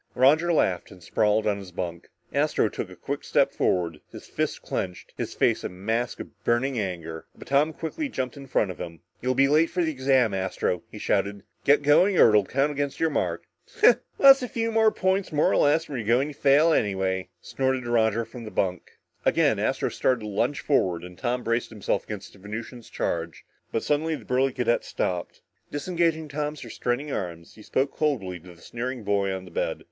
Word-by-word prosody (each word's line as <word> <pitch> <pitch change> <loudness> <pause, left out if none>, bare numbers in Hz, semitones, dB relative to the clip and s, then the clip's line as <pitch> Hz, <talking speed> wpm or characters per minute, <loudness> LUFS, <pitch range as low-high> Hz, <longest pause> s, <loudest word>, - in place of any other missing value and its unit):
Roger 150 +7 +4
laughed 95 - +1
and 90 -2 -14
sprawled 110 +2 +1
on 105 -2 +1
his 95 -2 -10
bunk. 85 -1 -5 0.2
Astro - - +2
took - - -5
a - - -11
quick - - -5
step - - +2
forward, 85 -4 0
his - - -10
fists - - -2
clenched, 90 -1 -5
his - - -5
face - - +2
a - - -2
mask 110 +7 -2
of - - -10
burning 120 +1 +1
anger, 85 -5 -5
but - - -12
Tom 145 +3 +3
quickly 170 - -4
jumped 130 - -3
in 140 -1 -10
front 105 -6 +1
of 90 - -11
him. 85 -1 -7 0.2
"You'll 130 +1 0
be 135 +1 +5
late 155 +3 +4
for 180 -1 0
the 160 - 0
exam, 130 -5 +2
Astro!" 95 -2 -1
he - - -9
shouted. 100 -1 -1 0.2
"Get 145 +1 +5
going 180 +7 +5
or - - +8
it'll 105 -2 +4
count 140 +6 +1
against 145 -1 -3
your 160 -1 +2
mark!" 145 - -1 0.4
"Huh. 440 - +7 0.2
What's 275 0 +8
a 250 - -2
few 230 -1 -2 0.2
points 190 -2 0
more 150 -1 +3
or - - +2
less 155 +3 +3
when 135 -4 -4
you're 110 - -5
going 125 +5 +3
to - - -8
fail 145 +3 +4
anyway," 95 - 0
snorted 130 +2 -1
Roger 115 -1 +2
from 115 +1 -10
the 110 - -7
bunk. 90 -4 -2 0.3
Again, - - +3
Astro - - 0
started 125 -3 +1
to 105 - -6
lunge 115 +7 -1
forward 90 - +1
and 90 0 -10
Tom 125 +4 -2
braced 115 +1 0
himself 105 -3 -2
against 105 -2 -7
the 100 - -17
Venusian's 110 +4 -7
charge, 85 0 -3 0.3
but 115 - -1
suddenly 155 +2 +1
the - - -11
burly 130 +1 +2
cadet 125 -2 0
stopped. 90 -1 -3 0.3
Disengaging 165 0 0
Tom's 150 +1 -4
restraining 125 +5 -2
arms, 85 -6 -5
he 110 - -15
spoke 130 +5 -1
coldly 105 - -1
to 90 +1 -14
the 85 - -20
sneering 125 0 -5
boy 100 -1 +1
on 95 0 -5
the 90 - -13
bed. - - -2
120 Hz, 205 wpm, -26 LUFS, 95-145 Hz, 0.4 s, or